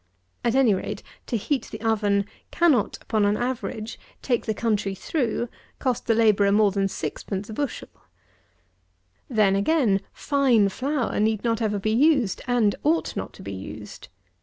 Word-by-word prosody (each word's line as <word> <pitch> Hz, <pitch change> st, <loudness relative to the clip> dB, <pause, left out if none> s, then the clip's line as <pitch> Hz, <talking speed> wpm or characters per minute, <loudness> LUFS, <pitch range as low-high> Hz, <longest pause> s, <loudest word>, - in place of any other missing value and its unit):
At 235 Hz, +1 st, +1 dB
any 260 Hz, -6 st, +5 dB
rate, 190 Hz, -, -4 dB, 0.2 s
to 235 Hz, -, 0 dB
heat 270 Hz, +6 st, -1 dB
the -, -, -7 dB
oven 205 Hz, -3 st, +1 dB, 0.2 s
cannot, 300 Hz, -, +2 dB
upon 215 Hz, -2 st, +1 dB
an 205 Hz, +1 st, +2 dB
average, 240 Hz, -3 st, -4 dB, 0.2 s
take 240 Hz, -3 st, 0 dB
the 220 Hz, -, +1 dB
country 210 Hz, -4 st, 0 dB
through, 240 Hz, -, -1 dB, 0.3 s
cost 250 Hz, -2 st, -2 dB
the 225 Hz, -, +3 dB
labourer 210 Hz, -3 st, +4 dB
more 205 Hz, 0 st, +4 dB
than 195 Hz, 0 st, +1 dB
6_d._ 195 Hz, +4 st, -4 dB
a 220 Hz, -, -7 dB
bushel. 285 Hz, +4 st, -3 dB, 1.4 s
Then, 210 Hz, -5 st, +3 dB
again, 205 Hz, -2 st, +2 dB
fine 260 Hz, -8 st, +2 dB
flour 260 Hz, +3 st, -1 dB
need 215 Hz, 0 st, +1 dB
not 230 Hz, -1 st, 0 dB
ever 210 Hz, -2 st, 0 dB
be 215 Hz, +2 st, -1 dB
used, 265 Hz, -4 st, +3 dB
and 235 Hz, -5 st, +3 dB
ought 320 Hz, +3 st, +1 dB
not -, -, -4 dB
to -, -, -12 dB
be 100 Hz, +1 st, -6 dB
used. 105 Hz, +2 st, -9 dB
220 Hz, 160 wpm, -25 LUFS, 200-250 Hz, 1.4 s, any